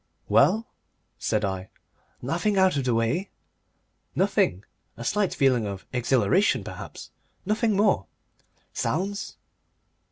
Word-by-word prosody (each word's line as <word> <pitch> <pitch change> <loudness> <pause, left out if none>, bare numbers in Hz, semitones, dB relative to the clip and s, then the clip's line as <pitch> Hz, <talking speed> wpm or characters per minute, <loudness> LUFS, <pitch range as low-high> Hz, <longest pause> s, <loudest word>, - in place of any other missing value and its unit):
"Well?" 220 +2 +4 0.5
said 105 -1 0
I. 95 -1 -4 0.5
"Nothing 175 - 0
out 190 -2 +4
of 140 -2 -1
the 125 -2 +2
way?" 115 - 0 0.9
"Nothing. 95 +3 +1 0.3
A 120 - -6
slight 205 - +1
feeling 125 -5 +2
of 100 -1 -6
exhilaration, 125 - +2
perhaps. - - -9 0.3
Nothing 215 +1 +1
more." 200 - +2 0.7
"Sounds?" 200 +6 -2
140 Hz, 105 wpm, -26 LUFS, -, 0.9 s, Well